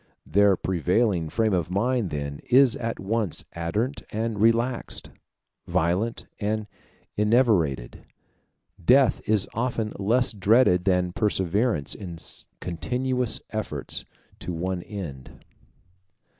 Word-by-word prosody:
Their 100 Hz, +3 st, +4 dB
prevailing 90 Hz, -1 st, +1 dB
frame 110 Hz, +3 st, +1 dB
of 85 Hz, -3 st, 0 dB
mind 115 Hz, +2 st, 0 dB
then 70 Hz, -1 st, -4 dB
is 130 Hz, -1 st, +6 dB
at 115 Hz, 0 st, -3 dB
once 105 Hz, -2 st, -2 dB
ardent 105 Hz, +11 st, -2 dB
and 110 Hz, -1 st, -2 dB
relaxed, 115 Hz, +2 st, +1 dB, 0.6 s
violent 90 Hz, +6 st, 0 dB
and 110 Hz, 0 st, -1 dB, 0.5 s
enervated. 105 Hz, -, +2 dB, 0.8 s
Death 130 Hz, +6 st, +5 dB
is 105 Hz, -3 st, +3 dB
often 115 Hz, -2 st, -1 dB
less 115 Hz, +5 st, +2 dB
dreaded 100 Hz, -2 st, +4 dB
than 90 Hz, -2 st, +2 dB
perseverance 100 Hz, -, 0 dB
in 90 Hz, -5 st, -7 dB, 0.4 s
continuous 125 Hz, +8 st, -1 dB
efforts 110 Hz, -1 st, -3 dB, 0.4 s
to -, -, -4 dB
one 90 Hz, +2 st, -2 dB
end. 85 Hz, -11 st, -8 dB
105 Hz, 100 wpm, -25 LUFS, 90-115 Hz, 0.8 s, is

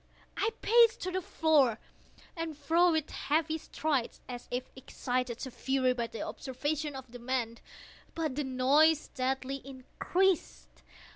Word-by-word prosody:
I 435 Hz, -, +1 dB
paced 465 Hz, 0 st, +5 dB
the 370 Hz, 0 st, -2 dB
floor 305 Hz, -9 st, +3 dB
to -, -, -28 dB
and 330 Hz, -3 st, -4 dB
fro 335 Hz, +4 st, +3 dB
with 315 Hz, -2 st, -1 dB
heavy 315 Hz, +1 st, 0 dB
strides, 290 Hz, -6 st, -2 dB
as 245 Hz, -1 st, -7 dB
if 250 Hz, +1 st, -3 dB
excited 250 Hz, -2 st, -3 dB
to 260 Hz, -, -5 dB
fury 260 Hz, 0 st, +1 dB
by 235 Hz, -2 st, -2 dB
the 230 Hz, -, -6 dB
observations 290 Hz, +3 st, -3 dB
of 260 Hz, -3 st, -9 dB
the 245 Hz, -, -9 dB
men—but 255 Hz, +5 st, -5 dB
the 295 Hz, -, -1 dB
noise 280 Hz, +4 st, +4 dB
steadily 265 Hz, +1 st, -2 dB
increased. 315 Hz, +7 st, -1 dB
275 Hz, 135 wpm, -31 LUFS, 255-315 Hz, -, paced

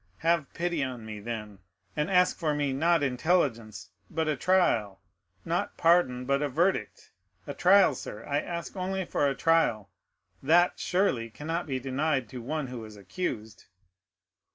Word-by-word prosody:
Have 165 Hz, -3 st, +2 dB
pity 170 Hz, -3 st, -1 dB
on 125 Hz, -4 st, -5 dB
me, 105 Hz, -1 st, -7 dB
then, 105 Hz, -2 st, -6 dB, 0.4 s
and 150 Hz, +4 st, -1 dB
ask 180 Hz, -1 st, +3 dB
for 155 Hz, -4 st, -1 dB
me, 145 Hz, -2 st, 0 dB
not 165 Hz, +3 st, +2 dB
intelligence, 125 Hz, -, 0 dB, 0.2 s
but 160 Hz, -1 st, -2 dB
a 155 Hz, -, +1 dB
trial; 120 Hz, -, +1 dB, 0.5 s
not -, -, -2 dB
pardon, 165 Hz, -7 st, +3 dB
but 140 Hz, +1 st, +1 dB
a 145 Hz, -, 0 dB
verdict—a 195 Hz, -, -3 dB
trial, 185 Hz, -3 st, +5 dB
sir, 105 Hz, -4 st, -8 dB
I 145 Hz, 0 st, 0 dB
ask 170 Hz, +3 st, -5 dB
only 190 Hz, 0 st, -2 dB
for 145 Hz, -, 0 dB
a 135 Hz, -, -1 dB
trial; 120 Hz, -, +1 dB, 0.5 s
that, 170 Hz, +5 st, +3 dB
surely, 180 Hz, -12 st, 0 dB
cannot 165 Hz, +8 st, -4 dB
be 130 Hz, -2 st, -2 dB
denied 135 Hz, -1 st, -1 dB
to 125 Hz, +1 st, -7 dB
one 150 Hz, +4 st, -3 dB
who 125 Hz, -3 st, -7 dB
is 110 Hz, -1 st, -11 dB
accused!" 110 Hz, -, -5 dB
145 Hz, 155 wpm, -28 LUFS, 120-170 Hz, 0.5 s, trial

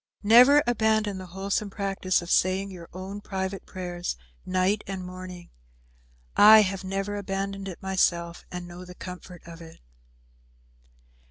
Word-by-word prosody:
Never 250 Hz, +7 st, +7 dB
abandon 220 Hz, -4 st, +1 dB
the 185 Hz, -, -8 dB
wholesome 195 Hz, +3 st, -2 dB
practice 195 Hz, -2 st, -1 dB
of 170 Hz, -, -6 dB
saying 190 Hz, +2 st, +2 dB
your 170 Hz, -3 st, -10 dB
own 190 Hz, +3 st, -7 dB
private 190 Hz, -1 st, -4 dB
prayers, 175 Hz, -, -5 dB, 0.3 s
night 185 Hz, +3 st, +1 dB
and 190 Hz, -1 st, -5 dB
morning. 180 Hz, -1 st, -9 dB, 0.8 s
I 215 Hz, +1 st, +9 dB
have 195 Hz, -1 st, -3 dB
never 195 Hz, +2 st, -3 dB
abandoned 195 Hz, 0 st, -4 dB
it 185 Hz, -1 st, -8 dB
myself, 175 Hz, -3 st, 0 dB
and 180 Hz, 0 st, -6 dB
I 175 Hz, -, -11 dB
know 180 Hz, +1 st, -9 dB
the 180 Hz, 0 st, -11 dB
comfort 180 Hz, -1 st, -10 dB
of 170 Hz, 0 st, -11 dB
it." 165 Hz, -1 st, -13 dB
190 Hz, 145 wpm, -26 LUFS, 180-200 Hz, 0.8 s, I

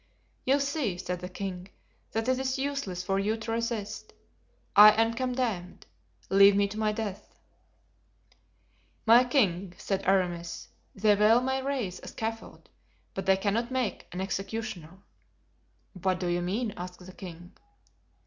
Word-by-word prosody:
"You 275 Hz, +2 st, +4 dB
see," 280 Hz, -, -1 dB
said 180 Hz, 0 st, -4 dB
the 180 Hz, 0 st, -6 dB
king, 185 Hz, -1 st, -5 dB, 0.5 s
"that 225 Hz, +1 st, -1 dB
it 255 Hz, 0 st, +2 dB
is 265 Hz, +1 st, -1 dB
useless 265 Hz, -10 st, -3 dB
for 195 Hz, +1 st, 0 dB
you 215 Hz, +3 st, 0 dB
to 225 Hz, 0 st, -5 dB
resist. 230 Hz, -2 st, -3 dB, 0.6 s
I 210 Hz, +1 st, +11 dB
am 225 Hz, 0 st, +3 dB
condemned; 235 Hz, -7 st, -2 dB, 0.4 s
leave 195 Hz, +1 st, +7 dB
me 200 Hz, 0 st, +3 dB
to 210 Hz, +2 st, -6 dB
my 215 Hz, -1 st, +2 dB
death." 210 Hz, -3 st, -5 dB, 1.7 s
"My 235 Hz, +2 st, +7 dB
king," 195 Hz, -, +1 dB
said 195 Hz, -1 st, -2 dB
Aramis, 175 Hz, -3 st, 0 dB, 0.3 s
"they 210 Hz, +1 st, +4 dB
well 215 Hz, +3 st, +5 dB
may 265 Hz, +1 st, -1 dB
raise 260 Hz, -10 st, -2 dB
a -, -, -10 dB
scaffold, 225 Hz, 0 st, -6 dB, 0.5 s
but 195 Hz, -1 st, -5 dB
they 190 Hz, 0 st, +5 dB
cannot 215 Hz, +4 st, 0 dB
make 255 Hz, -4 st, -2 dB
an 180 Hz, -, -4 dB
executioner." 195 Hz, -3 st, -4 dB, 1.0 s
"What 185 Hz, -1 st, -1 dB
do 185 Hz, -, -3 dB
you 175 Hz, 0 st, 0 dB
mean?" 205 Hz, +5 st, -2 dB
asked 180 Hz, 0 st, -8 dB
the 185 Hz, -, -11 dB
king. 180 Hz, 0 st, -10 dB
205 Hz, 145 wpm, -28 LUFS, 185-230 Hz, 1.7 s, I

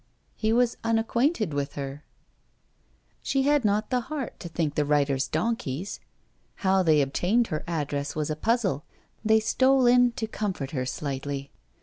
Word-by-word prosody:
He 220 Hz, 0 st, 0 dB
was 240 Hz, 0 st, +2 dB
unacquainted 230 Hz, -, +1 dB
with 140 Hz, -1 st, -3 dB
her! 140 Hz, +1 st, -5 dB, 1.2 s
She 270 Hz, -1 st, 0 dB
had 290 Hz, -1 st, +3 dB
not 210 Hz, +2 st, +1 dB
the 250 Hz, -, +3 dB
heart 290 Hz, -6 st, -4 dB
to 170 Hz, -, -7 dB
think 160 Hz, -3 st, -1 dB
the 150 Hz, -, +1 dB
writers 140 Hz, -2 st, +1 dB
donkeys. 200 Hz, -, -2 dB, 0.7 s
How 190 Hz, 0 st, +4 dB
they 155 Hz, -5 st, +4 dB
obtained 195 Hz, -, +1 dB
her 155 Hz, 0 st, -3 dB
address 145 Hz, -3 st, -2 dB
was 155 Hz, 0 st, -1 dB
a -, -, -1 dB
puzzle; 195 Hz, -, 0 dB, 0.4 s
they 220 Hz, 0 st, +5 dB
stole 260 Hz, +4 st, +3 dB
in 245 Hz, 0 st, +5 dB
to 230 Hz, -, -3 dB
comfort 195 Hz, -10 st, -3 dB
her 130 Hz, -3 st, -2 dB
slightly. 140 Hz, 0 st, -4 dB
190 Hz, 150 wpm, -26 LUFS, 145-235 Hz, 1.2 s, they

